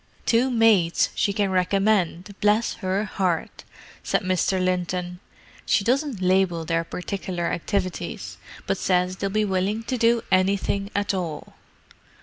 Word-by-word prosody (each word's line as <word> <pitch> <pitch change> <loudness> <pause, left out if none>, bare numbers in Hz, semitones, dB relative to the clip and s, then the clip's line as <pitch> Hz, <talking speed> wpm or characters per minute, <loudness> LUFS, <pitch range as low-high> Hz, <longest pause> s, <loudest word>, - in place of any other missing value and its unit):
"Two 240 +3 +3
maids 220 -8 +3
she 200 - +1
can 200 -1 0
recommend, 190 0 +1
bless 210 +3 +2
her 190 +1 0
heart!" 185 -5 -2 0.4
said - - 0
Mr. 185 +1 +1
Linton. 180 -1 -2 0.5
"She 200 - +3
doesn't 255 -2 0
label 180 -3 +2
their 165 +1 0
particular 180 0 -4
activities, 185 +2 -3 0.3
but - - -1
says 180 0 +1
they'll 195 - -2
be 215 +2 +1
willing 195 +3 -1
to 250 +1 -3
do 230 0 +3
anything 195 +1 +1
at 205 0 0
all." 175 -5 -4
190 Hz, 135 wpm, -24 LUFS, 180-210 Hz, 0.5 s, Two